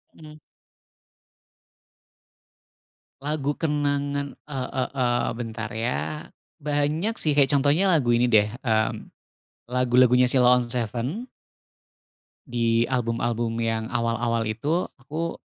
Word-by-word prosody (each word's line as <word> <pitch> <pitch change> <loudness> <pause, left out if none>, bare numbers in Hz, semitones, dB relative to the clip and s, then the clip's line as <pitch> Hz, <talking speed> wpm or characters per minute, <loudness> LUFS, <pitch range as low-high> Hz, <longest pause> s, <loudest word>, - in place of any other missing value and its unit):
Mmm. 155 -1 -13 2.8
Lagu 145 0 -1
kenangan, 145 -2 -1 0.2
e 140 -2 -6 0.2
e 130 - +3
eee, 120 -2 +1
bentar, 115 -2 -5
ya, 80 -10 -3 0.3
banyak, 150 +8 0
sih, 150 -2 +1
kayak 140 -1 +4
contohnya 145 +7 +3
lagu 125 -8 +3
ini, 120 +1 +2
deh, 105 -2 +5 0.2
mmm, 110 -3 +1 0.8
lagu-lagunya 125 0 +4
Sheila 125 -1 +5
on 120 - -2
7. 120 - -3 1.3
Di 115 -1 +1
album-album 115 -2 -1
yang 115 -1 -1
awal-awal 115 -1 0
itu 145 +11 -1
aku 155 +5 -4
125 Hz, 100 wpm, -25 LUFS, 115-145 Hz, 2.8 s, deh